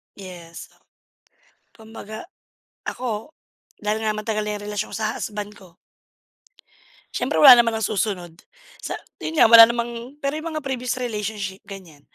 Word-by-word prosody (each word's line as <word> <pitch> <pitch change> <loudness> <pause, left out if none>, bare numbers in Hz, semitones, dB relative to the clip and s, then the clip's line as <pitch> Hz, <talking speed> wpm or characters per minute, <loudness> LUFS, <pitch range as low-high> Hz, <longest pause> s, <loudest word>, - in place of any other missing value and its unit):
Yes. 175 -4 -11 1.0
Kumbaga 220 +2 -10 0.6
ako 245 +4 -4 0.5
dahil 210 +1 0
nga 215 - +1
matagal 215 0 -2
na 210 - -2
yung 205 - -9
relasyon 205 - -4
sa 220 0 -2
husband 210 -1 -5
ko 180 -3 -18 1.4
siyempre - - -1
wala 255 -4 +10
naman 230 -1 -1
nang 220 - -1
susunod 190 -5 -2 0.5
sa - - -4 0.2
yun 320 0 -4
nga - - +7
wala 230 0 +10
namang 235 +3 -4
pero 280 -1 -2
yung 310 +2 -4
mga 295 - -6
previous 255 -1 -2
relationship 210 -5 -4
ganiyan. 180 -7 -12
220 Hz, 140 wpm, -22 LUFS, 205-240 Hz, 1.4 s, wala